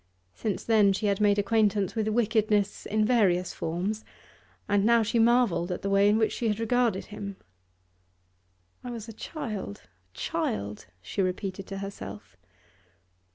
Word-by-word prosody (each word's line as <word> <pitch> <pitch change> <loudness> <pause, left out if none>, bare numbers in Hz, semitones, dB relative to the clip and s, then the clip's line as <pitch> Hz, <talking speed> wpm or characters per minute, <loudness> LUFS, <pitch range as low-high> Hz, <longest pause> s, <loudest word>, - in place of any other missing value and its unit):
Since 210 -3 -3
then 210 -3 +4
she 210 - -2
had 200 0 +1
made 205 -1 +4
acquaintance 205 -2 +2
with 220 -2 -1
wickedness 215 -2 +1
in 215 +1 +1
various 190 -7 +2
forms, 190 +7 -3 0.6
and 205 -1 +2
now 230 +1 +5
she 230 +2 0
marvelled 225 -7 +3
at 180 - -4
the 195 - -1
way 200 +1 +5
in 210 - +4
which 220 -1 +2
she 235 - -2
had 210 0 0
regarded 230 -3 +1
him. 200 -1 -7 1.5
'I 250 - -6
was 230 -2 -6
a 225 - -8
child, 215 - -6 0.3
a - - -22
child,' 100 -1 -3 0.2
she 195 - -2
repeated 185 +1 -3
to 195 - -5
herself. 105 - -8
205 Hz, 155 wpm, -28 LUFS, 195-225 Hz, 1.5 s, now